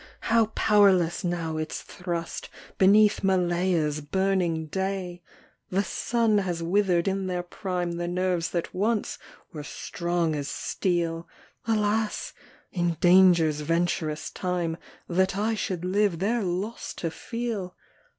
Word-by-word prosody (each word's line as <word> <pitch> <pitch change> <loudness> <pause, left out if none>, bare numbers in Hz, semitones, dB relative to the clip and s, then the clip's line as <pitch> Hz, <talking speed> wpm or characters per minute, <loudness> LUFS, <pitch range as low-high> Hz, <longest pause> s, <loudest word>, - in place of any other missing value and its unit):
how 230 -2 +5
powerless 190 -5 +4
now 170 -3 -2
its 155 0 -4
thrust, 170 -2 -5 0.3
Beneath 205 +2 +5
Malaya's 175 -5 +1
burning 175 0 0
day! 190 +1 -3 0.5
The 195 +2 +1
sun 225 +2 +1
has 175 -4 -2
wither'd 180 -1 +2
in 195 0 -1
their 180 -1 -2
prime 175 -1 -3
The 175 0 -2
nerves 180 -1 0
that 170 -2 -3
once 210 +3 -1 0.3
were 155 - -5
strong 170 +1 -2
as 145 -1 -3
steel: 170 0 -1 0.4
Alas! 215 0 0 0.4
in 175 -2 0
danger's 175 -3 +5
venturous 165 -1 -1
time 175 -3 -2 0.3
That 185 +2 +1
I 220 +2 +1
should 185 -5 -3
live 195 -1 +2
their 220 +7 0
loss 195 +4 -3
to 165 - -3
feel 230 -4 -4
180 Hz, 120 wpm, -26 LUFS, 170-195 Hz, 0.5 s, how